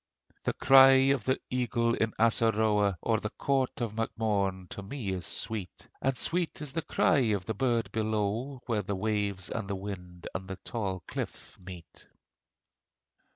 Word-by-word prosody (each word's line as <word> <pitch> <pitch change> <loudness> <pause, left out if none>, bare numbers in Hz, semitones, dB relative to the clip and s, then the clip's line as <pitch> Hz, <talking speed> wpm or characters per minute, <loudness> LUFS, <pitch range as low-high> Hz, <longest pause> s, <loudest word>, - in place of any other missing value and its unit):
The - - +1
cry 135 0 +7
of 125 -7 -3
the 130 - +1
eagle 120 -2 +1
of 110 -1 0
Assaroe 110 -3 +3
O'er 110 -2 +2
the 105 - -3
court 135 0 -1
of 115 -3 -2
Mac 115 0 -1
Morne 100 -4 0
to - - -5
me 110 +1 -5
is 90 -3 -3
sweet, 105 -5 -3
And 135 -1 0
sweet 175 0 -1
is 150 -3 -4
the 165 - -1
cry 150 - +2
of 95 -3 -2
the 110 - -2
bird 115 -3 0
below 110 +4 -1
Where 115 -4 0
the 100 0 -3
wave 100 -2 -2
and 110 -4 -3
the 100 - -2
wind 90 -3 -7
and 95 0 -5
the 95 - -5
tall 95 -3 -4
cliff - - -6
meet. 90 -3 -12
110 Hz, 165 wpm, -29 LUFS, 100-125 Hz, -, cry